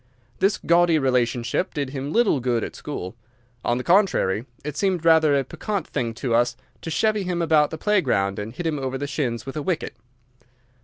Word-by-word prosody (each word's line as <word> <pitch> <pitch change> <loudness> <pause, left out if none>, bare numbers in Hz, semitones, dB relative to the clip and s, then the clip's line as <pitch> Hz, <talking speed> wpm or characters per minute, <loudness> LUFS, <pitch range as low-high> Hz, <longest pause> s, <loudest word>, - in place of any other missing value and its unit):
This 195 +2 +2
gaudy 170 -1 +3
relationship 125 +1 0
did 140 -3 -2
him 140 +1 -4
little 225 - +3
good 120 -3 0
at - - -6
school. 90 +5 -6 0.5
On 120 - +1
the 125 - -3
contrary, 155 - +2 0.2
it 150 0 -5
seemed 180 -1 0
rather 160 -3 +5
a 135 - +1
piquant 200 - -4
thing 120 -5 -3
to 120 0 -2
us 120 +1 +2 0.2
to - - -5
chevy 215 +5 +1
him 180 -2 -2
about 155 -3 +3
the 160 - -6
playground 130 - +1
and 105 +2 -5
hit 175 +8 -6
him 155 -3 -1
over 135 0 -3
the 140 - -3
shins 130 -5 -2
with 135 - -7
a 155 - -2
wicket. 170 +1 -2
145 Hz, 195 wpm, -23 LUFS, 120-170 Hz, 0.5 s, rather